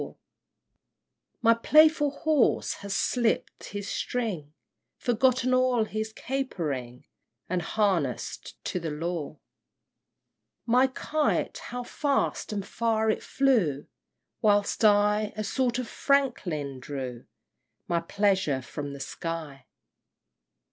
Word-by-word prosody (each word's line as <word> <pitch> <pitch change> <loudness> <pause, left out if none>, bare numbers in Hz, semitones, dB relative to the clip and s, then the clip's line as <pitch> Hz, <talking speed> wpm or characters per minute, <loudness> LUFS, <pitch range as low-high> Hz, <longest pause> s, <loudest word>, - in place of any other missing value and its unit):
My 230 0 +7
playful 305 +5 +5
horse 295 -1 +2
has 200 0 -3
slipt 240 -3 0
his 205 0 -6
string, 185 -12 -3 0.4
Forgotten 255 +1 +2
all 255 -2 +3
his 215 +1 -3
capering, 155 - -4 0.4
And 180 0 -1
harness'd 175 - -1
to 180 - -1
the 165 -1 -4
law! 160 0 -3
IV. - - -27 1.3
My 250 +3 +4
kite 300 +3 -1
how 245 +1 -5
fast 280 0 -1
and 200 -2 -3
far 220 -1 +1
it - - -3
flew! 220 - +1 0.6
Whilst 205 -1 +2
I, 210 0 +4
a 215 - -1
sort 245 +3 0
of 255 -2 -3
Franklin, 175 - 0
drew 130 -3 -6 0.6
My 170 - +1
pleasure 190 -6 +1
from 145 +1 -6
the 140 - -8
sky! 155 -3 -6
210 Hz, 105 wpm, -27 LUFS, 160-250 Hz, 1.3 s, My